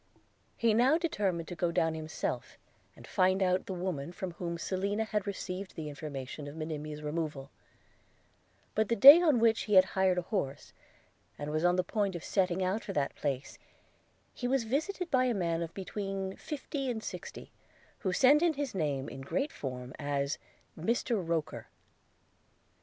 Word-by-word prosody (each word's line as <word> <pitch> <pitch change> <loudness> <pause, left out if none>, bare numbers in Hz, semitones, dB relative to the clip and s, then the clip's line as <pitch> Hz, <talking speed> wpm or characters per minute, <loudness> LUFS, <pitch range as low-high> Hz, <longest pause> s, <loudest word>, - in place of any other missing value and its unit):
– 100 - -40
He 230 -2 +3
now 255 +8 +5
determined 200 - -1
to 175 - -5
go 170 +1 0
down 165 -2 +1
himself, 160 0 -4 0.4
and - - -13
find 185 0 +2
out 185 0 +1
the 190 - -3
woman 175 -4 -3
from 180 +1 -5
whom 170 0 -4
Selina 200 +5 -1
had 210 -2 -2
received 190 -1 -5
the 155 -2 -5
information 145 -1 -6
of 145 - -8
Monimia's 155 -1 -5
removal; 150 -3 -3 1.2
but, 215 -1 +1
the 230 - +3
day 280 - +11
on 310 -7 +4
which 225 -1 +3
he 210 - +1
had 185 0 +8
hired 190 -1 +3
an 180 - 0
horse, 170 -9 -3 0.6
and 145 +1 -4
was 155 +1 0
on 175 0 +4
the 185 - +2
point 200 -2 -1
of 170 - -6
setting 185 -1 +1
out 195 +4 -1
for 205 -2 -5
that 145 -5 0
place, 140 -2 -3 0.7
he 245 - -3
was 260 -1 +2
visited 320 - -2
by 255 -1 +4
a 245 -2 +1
man 170 -3 0
of 165 -1 -4
between 195 0 -4
fifty 285 -2 -4
and 220 -3 -3
sixty, - - -7 0.5
who 190 - -1
sent 275 +10 +5
in 340 -2 +3
his 280 -2 -3
name, 145 -7 -1
in 130 +3 -8
great 275 - -1
form, 125 -2 -6
as 140 -1 -1 0.4
Mr 225 +4 0
Roker. 165 -2 -2
185 Hz, 175 wpm, -31 LUFS, 155-220 Hz, 1.2 s, day